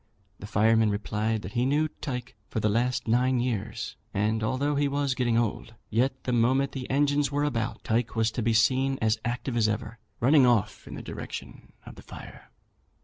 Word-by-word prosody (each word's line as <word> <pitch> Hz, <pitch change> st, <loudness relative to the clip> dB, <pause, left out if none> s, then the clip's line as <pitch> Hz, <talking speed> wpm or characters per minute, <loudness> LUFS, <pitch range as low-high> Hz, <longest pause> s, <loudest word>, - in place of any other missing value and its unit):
The 105 Hz, -, -8 dB
fireman 110 Hz, +1 st, +3 dB
replied 105 Hz, +1 st, -1 dB
that 95 Hz, -, -6 dB
he 120 Hz, -, 0 dB
knew 145 Hz, +4 st, +2 dB
Tyke 125 Hz, -4 st, -6 dB
for -, -, -2 dB
the 105 Hz, -, +1 dB
last 120 Hz, +3 st, 0 dB
nine 125 Hz, +2 st, +2 dB
years; 115 Hz, -2 st, -3 dB, 0.2 s
and 110 Hz, +2 st, +1 dB
although 135 Hz, +6 st, 0 dB
he 145 Hz, 0 st, +2 dB
was 140 Hz, -1 st, 0 dB
getting 120 Hz, -2 st, +1 dB
old, 115 Hz, 0 st, -2 dB, 0.2 s
yet 130 Hz, +4 st, 0 dB
the 125 Hz, -, -1 dB
moment 130 Hz, +4 st, +2 dB
the 130 Hz, -2 st, -6 dB
engines 145 Hz, +1 st, +2 dB
were 145 Hz, +1 st, 0 dB
about, 120 Hz, -6 st, -2 dB
Tyke 115 Hz, 0 st, 0 dB
was 110 Hz, 0 st, +2 dB
to 120 Hz, -, -3 dB
be 115 Hz, +1 st, +1 dB
seen 130 Hz, +4 st, +3 dB
as 110 Hz, 0 st, +1 dB
active 120 Hz, +1 st, -3 dB
as 110 Hz, -2 st, +3 dB
ever, 110 Hz, +1 st, -4 dB, 0.2 s
running 135 Hz, +3 st, +5 dB
off 120 Hz, -5 st, +1 dB
in -, -, -7 dB
the -, -, -7 dB
direction -, -, -8 dB
of -, -, -10 dB
the -, -, -10 dB
fire. -, -, -12 dB
120 Hz, 195 wpm, -27 LUFS, 110-130 Hz, 0.2 s, running